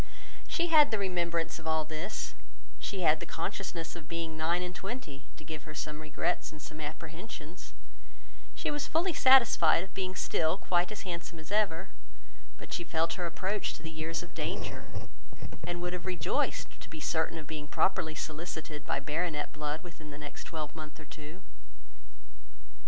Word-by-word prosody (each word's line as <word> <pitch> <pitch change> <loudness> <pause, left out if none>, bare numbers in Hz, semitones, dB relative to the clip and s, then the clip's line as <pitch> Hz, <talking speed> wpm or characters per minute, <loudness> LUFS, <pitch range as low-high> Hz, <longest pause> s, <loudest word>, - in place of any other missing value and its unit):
She 345 0 +2
had 305 -3 +9
the 220 - +2
remembrance 170 -4 +1
of 160 - -7
all 160 -1 +3
this, 160 +6 -3 0.5
she 195 -2 -2
had 155 -1 +6
the - - -4
consciousness 175 -2 -3
of 160 -3 -8
being 165 -1 -2
nine 170 +3 +2
and 180 0 -3
twenty 190 - -5
to 155 - -10
give 155 -1 -6
her 155 -1 -8
some 150 0 -3
regrets 155 +3 0
and 155 - -10
some 155 +1 -7
apprehensions; 160 +2 -6 0.8
she - - 0
was 295 0 -1
fully 340 +3 +3
satisfied 235 - +7
of 190 - -10
being 185 -1 -1
still 165 -2 +2
quite 180 0 +2
as 215 - -4
handsome 170 -2 -4
as 160 +3 -10
ever, 195 -4 +2 0.7
but - - -8
she 175 - 0
felt 165 -1 +2
her 180 -2 -1
approach 190 +4 0
to - - -10
the 160 - -4
years 160 +1 -2
of - - -11
danger, - - -2 0.8
and 175 0 -2
would 180 0 0
have 180 +1 -4
rejoiced 180 -5 +1
to - - -9
be 160 - -6
certain 160 +1 +1
of 155 - -6
being 150 0 -4
properly 160 0 +2
solicited 155 -1 -4
by - - +2
baronet 150 +1 -1
blood 150 +1 -2
within 165 -3 -9
the 145 - -7
next 150 -1 -7
twelvemonth 155 -1 -5
or 155 - -9
two. 155 +5 -9
165 Hz, 175 wpm, -32 LUFS, 155-185 Hz, 0.8 s, had